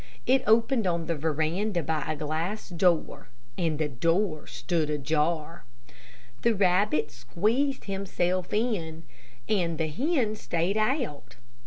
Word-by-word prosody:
It 260 Hz, +1 st, +4 dB
opened 230 Hz, 0 st, +3 dB
on 170 Hz, -2 st, 0 dB
the 170 Hz, -, -1 dB
veranda 160 Hz, +5 st, 0 dB
by 160 Hz, -1 st, -1 dB
a -, -, -2 dB
glass 160 Hz, +9 st, -3 dB
door, 175 Hz, -2 st, +1 dB, 0.3 s
and 160 Hz, -1 st, 0 dB
the 155 Hz, 0 st, 0 dB
door 165 Hz, -, 0 dB
stood 165 Hz, -4 st, -1 dB
ajar. 155 Hz, +2 st, -1 dB, 0.8 s
The 235 Hz, -1 st, +3 dB
rabbit 185 Hz, -, +2 dB
squeezed 215 Hz, -, 0 dB
himself 185 Hz, -2 st, -1 dB
in, 185 Hz, -8 st, -1 dB, 0.4 s
and 175 Hz, -6 st, +1 dB
the 160 Hz, 0 st, -1 dB
hen 245 Hz, -, 0 dB
stayed 175 Hz, -1 st, -1 dB
out. 215 Hz, -, -1 dB
175 Hz, 125 wpm, -27 LUFS, 155-210 Hz, 0.8 s, It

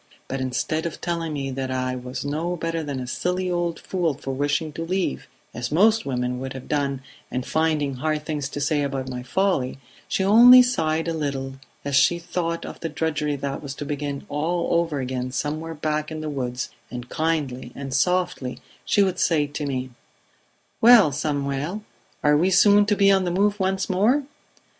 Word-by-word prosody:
But 135 Hz, 0 st, -3 dB
instead 130 Hz, +6 st, -1 dB
of 165 Hz, -, -7 dB
telling 170 Hz, -2 st, -2 dB
me 135 Hz, -2 st, -3 dB
that 130 Hz, 0 st, -3 dB
I 130 Hz, 0 st, -1 dB
was 125 Hz, +2 st, -6 dB
no 160 Hz, +5 st, -1 dB
better 165 Hz, -1 st, -2 dB
than 145 Hz, -3 st, -4 dB
a 125 Hz, -, -4 dB
silly 180 Hz, +7 st, -1 dB
old 175 Hz, -1 st, -1 dB
fool 175 Hz, -6 st, -1 dB
for 135 Hz, 0 st, -5 dB
wishing 145 Hz, +3 st, -1 dB
to 165 Hz, -, -4 dB
leave 180 Hz, -, -2 dB, 0.3 s
as 120 Hz, +1 st, -4 dB
most 215 Hz, +4 st, +4 dB
women 125 Hz, -1 st, -1 dB
would 130 Hz, +1 st, -5 dB
have 130 Hz, -1 st, -9 dB
done 140 Hz, -2 st, -1 dB, 0.3 s
and 125 Hz, 0 st, -3 dB
finding 155 Hz, -4 st, 0 dB
hard 155 Hz, +2 st, -1 dB
things 145 Hz, -3 st, -3 dB
to 145 Hz, -, -5 dB
say 145 Hz, +1 st, +1 dB
about 135 Hz, -2 st, -2 dB
my 125 Hz, 0 st, -4 dB
folly, 135 Hz, 0 st, 0 dB, 0.3 s
she 190 Hz, -, 0 dB
only 240 Hz, +5 st, +9 dB
sighed 165 Hz, -10 st, 0 dB
a 165 Hz, -, 0 dB
little 140 Hz, -4 st, -3 dB, 0.3 s
as 140 Hz, -1 st, 0 dB
she 140 Hz, +5 st, +5 dB
thought 170 Hz, -1 st, -3 dB
of -, -, -8 dB
the 165 Hz, -, -3 dB
drudgery 150 Hz, -1 st, -1 dB
that 140 Hz, 0 st, -4 dB
was 140 Hz, -2 st, -6 dB
to 145 Hz, -, -6 dB
begin 145 Hz, -1 st, -4 dB
all 170 Hz, +5 st, -1 dB
over 165 Hz, -4 st, +1 dB
again 130 Hz, 0 st, -3 dB
somewhere 155 Hz, +4 st, -3 dB
back 155 Hz, 0 st, -2 dB
in 155 Hz, -1 st, -5 dB
the 155 Hz, -1 st, -3 dB
woods, 125 Hz, -2 st, -3 dB, 0.2 s
and 120 Hz, 0 st, -7 dB
kindly 145 Hz, -6 st, -2 dB
and 135 Hz, -1 st, -6 dB
softly 175 Hz, -4 st, 0 dB, 0.3 s
she 205 Hz, -, +3 dB
would 190 Hz, -2 st, -1 dB
say 155 Hz, -3 st, +3 dB
to 145 Hz, 0 st, -4 dB
me: 130 Hz, -2 st, -3 dB, 0.9 s
'Well, 225 Hz, -9 st, +8 dB
Samuel! 145 Hz, +6 st, -2 dB, 0.4 s
Are 150 Hz, 0 st, +5 dB
we 170 Hz, +5 st, +3 dB
soon 205 Hz, +2 st, +5 dB
to 205 Hz, -, +3 dB
be 200 Hz, -1 st, +5 dB
on 190 Hz, -1 st, +3 dB
the 180 Hz, -, -1 dB
move 200 Hz, +3 st, +1 dB
once 190 Hz, 0 st, 0 dB
more?' 220 Hz, +10 st, +2 dB
150 Hz, 190 wpm, -24 LUFS, 135-175 Hz, 0.9 s, only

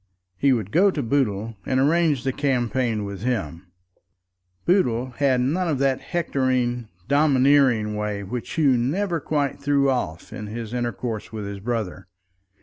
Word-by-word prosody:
He 135 Hz, +8 st, +2 dB
would 110 Hz, -6 st, 0 dB
go 195 Hz, +5 st, +5 dB
to 150 Hz, -7 st, -2 dB
Boodle 115 Hz, -4 st, 0 dB
and 130 Hz, +6 st, 0 dB
arrange 150 Hz, -1 st, +2 dB
the 130 Hz, -1 st, -1 dB
campaign 125 Hz, -5 st, 0 dB
with 100 Hz, -1 st, -6 dB
him. 95 Hz, -, -3 dB, 1.0 s
Boodle 130 Hz, -, +2 dB
had 135 Hz, -3 st, +2 dB
none 165 Hz, +8 st, 0 dB
of 155 Hz, -4 st, 0 dB
that 135 Hz, 0 st, +1 dB
hectoring, 130 Hz, -7 st, -1 dB, 0.2 s
domineering 135 Hz, -6 st, +3 dB
way 105 Hz, -1 st, -3 dB
which 115 Hz, +5 st, -5 dB
Hugh 140 Hz, -6 st, +3 dB
never 170 Hz, +8 st, 0 dB
quite 145 Hz, -1 st, -1 dB
threw 140 Hz, -1 st, +2 dB
off 85 Hz, -11 st, -3 dB
in 105 Hz, -, -6 dB
his 115 Hz, +1 st, -6 dB
intercourse 120 Hz, -2 st, -3 dB
with 110 Hz, -2 st, -5 dB
his 100 Hz, 0 st, -6 dB
brother. 105 Hz, -4 st, -3 dB
125 Hz, 145 wpm, -23 LUFS, 110-140 Hz, 1.0 s, go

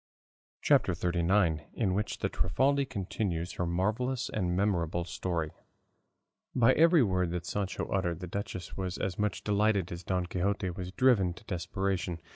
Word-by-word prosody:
CHAPTER -, -, +4 dB
XXXIX. 85 Hz, -2 st, +1 dB
IN 100 Hz, -6 st, +1 dB
WHICH 105 Hz, +3 st, -1 dB
THE -, -, +1 dB
TRIFALDI 135 Hz, +10 st, +1 dB
CONTINUES 95 Hz, -6 st, -3 dB
HER 90 Hz, -, 0 dB
MARVELLOUS 115 Hz, +9 st, 0 dB
AND 90 Hz, -4 st, -1 dB
MEMORABLE 85 Hz, -4 st, +1 dB
STORY 85 Hz, -4 st, -2 dB, 1.0 s
By 125 Hz, +1 st, +5 dB
every 165 Hz, -1 st, +6 dB
word 90 Hz, -4 st, +1 dB
that 85 Hz, 0 st, -3 dB
Sancho 100 Hz, +1 st, -2 dB
uttered, 90 Hz, -4 st, -1 dB
the 90 Hz, -, -5 dB
duchess 95 Hz, 0 st, -5 dB
was 95 Hz, -2 st, -3 dB
as 95 Hz, 0 st, -3 dB
much 105 Hz, -1 st, -1 dB
delighted 105 Hz, -3 st, +2 dB
as 85 Hz, 0 st, -5 dB
Don 90 Hz, 0 st, -1 dB
Quixote 95 Hz, +1 st, -1 dB
was 90 Hz, +1 st, -6 dB
driven 100 Hz, -7 st, +3 dB
to 110 Hz, -, -14 dB
desperation. 95 Hz, -2 st, -2 dB
95 Hz, 150 wpm, -30 LUFS, 90-105 Hz, 1.0 s, every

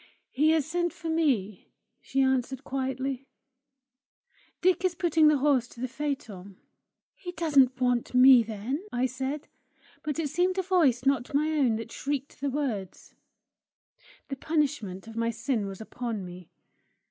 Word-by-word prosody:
"He 300 Hz, +4 st, +3 dB
has 315 Hz, -3 st, +3 dB
sent 345 Hz, +2 st, -1 dB
for 330 Hz, -, -6 dB
me," 255 Hz, -, 0 dB, 0.3 s
she 270 Hz, -, -1 dB
answered 265 Hz, -1 st, 0 dB
quietly. 265 Hz, 0 st, -3 dB, 1.3 s
"Dick 365 Hz, 0 st, +2 dB
is 365 Hz, -2 st, +1 dB
putting 325 Hz, -3 st, +3 dB
the 300 Hz, -1 st, +5 dB
horse 270 Hz, -3 st, +2 dB
to 240 Hz, -, -15 dB
the 255 Hz, -, -2 dB
phaeton." 230 Hz, -9 st, -5 dB, 0.6 s
"He 360 Hz, -, -8 dB
doesn't 280 Hz, -6 st, +3 dB
want 245 Hz, -1 st, 0 dB
me, 255 Hz, -1 st, +8 dB
then!" 225 Hz, -, -4 dB
I 245 Hz, +1 st, 0 dB
said; 265 Hz, +3 st, -4 dB, 0.5 s
but 300 Hz, -1 st, -3 dB
it 320 Hz, -3 st, -1 dB
seemed 360 Hz, +5 st, +1 dB
a 380 Hz, -, +1 dB
voice 315 Hz, -10 st, +2 dB
not 270 Hz, -1 st, +1 dB
my 305 Hz, +2 st, +2 dB
own 270 Hz, -7 st, +2 dB
that 225 Hz, +1 st, -6 dB
shrieked 280 Hz, -1 st, -4 dB
the 285 Hz, -, 0 dB
words. 245 Hz, -10 st, -4 dB, 1.2 s
The 275 Hz, -, -4 dB
punishment 265 Hz, -, -1 dB
of 225 Hz, -, -10 dB
my 230 Hz, 0 st, 0 dB
sin 230 Hz, -1 st, -2 dB
was 195 Hz, -1 st, -7 dB
upon 225 Hz, -2 st, -5 dB
me. 180 Hz, -1 st, -11 dB
265 Hz, 150 wpm, -28 LUFS, 235-300 Hz, 1.3 s, me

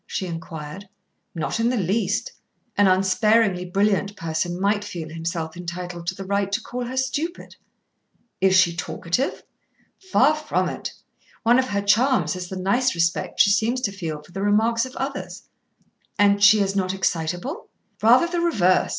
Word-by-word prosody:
she 190 Hz, -, -3 dB
inquired. 165 Hz, +2 st, -7 dB, 0.5 s
"Not 165 Hz, +7 st, -2 dB
in 230 Hz, +1 st, +2 dB
the 250 Hz, -, 0 dB
least. 200 Hz, +2 st, 0 dB, 0.4 s
An 205 Hz, -1 st, +4 dB
unsparingly 195 Hz, +1 st, +3 dB
brilliant 200 Hz, +2 st, 0 dB
person 165 Hz, 0 st, -3 dB
might 205 Hz, +1 st, +1 dB
feel 170 Hz, -6 st, -6 dB
himself 165 Hz, 0 st, -4 dB
entitled 175 Hz, 0 st, -6 dB
to 185 Hz, -, -1 dB
the 195 Hz, -, -7 dB
right 200 Hz, 0 st, -1 dB
to 210 Hz, -, +2 dB
call 245 Hz, +2 st, -5 dB
her 255 Hz, +2 st, -6 dB
stupid." 305 Hz, +7 st, -3 dB, 0.9 s
"Is 190 Hz, 0 st, +4 dB
she 175 Hz, -2 st, +4 dB
talkative?" 180 Hz, +7 st, -2 dB, 0.7 s
"Far 285 Hz, 0 st, +5 dB
from 305 Hz, 0 st, -1 dB
it. -, -, -5 dB, 0.5 s
One 240 Hz, +2 st, +5 dB
of 260 Hz, -, 0 dB
her 200 Hz, -4 st, -1 dB
charms 210 Hz, -, +2 dB
is 180 Hz, -1 st, -6 dB
the 190 Hz, -, -5 dB
nice 240 Hz, +7 st, +1 dB
respect 170 Hz, +5 st, +1 dB
she 200 Hz, -3 st, +5 dB
seems 230 Hz, +5 st, +1 dB
to 210 Hz, -, -1 dB
feel 160 Hz, -6 st, -5 dB
for 155 Hz, -, -18 dB
the 195 Hz, -, -5 dB
remarks 225 Hz, +4 st, +2 dB
of 260 Hz, -, -13 dB
others." 275 Hz, +1 st, -5 dB, 0.7 s
"And 205 Hz, 0 st, +3 dB
she 210 Hz, 0 st, +7 dB
is 195 Hz, 0 st, 0 dB
not 190 Hz, -1 st, 0 dB
excitable?" 180 Hz, -, -2 dB, 0.3 s
"Rather 240 Hz, +8 st, +6 dB
the 345 Hz, 0 st, -2 dB
reverse. 190 Hz, -, +2 dB
200 Hz, 165 wpm, -23 LUFS, 175-230 Hz, 0.9 s, she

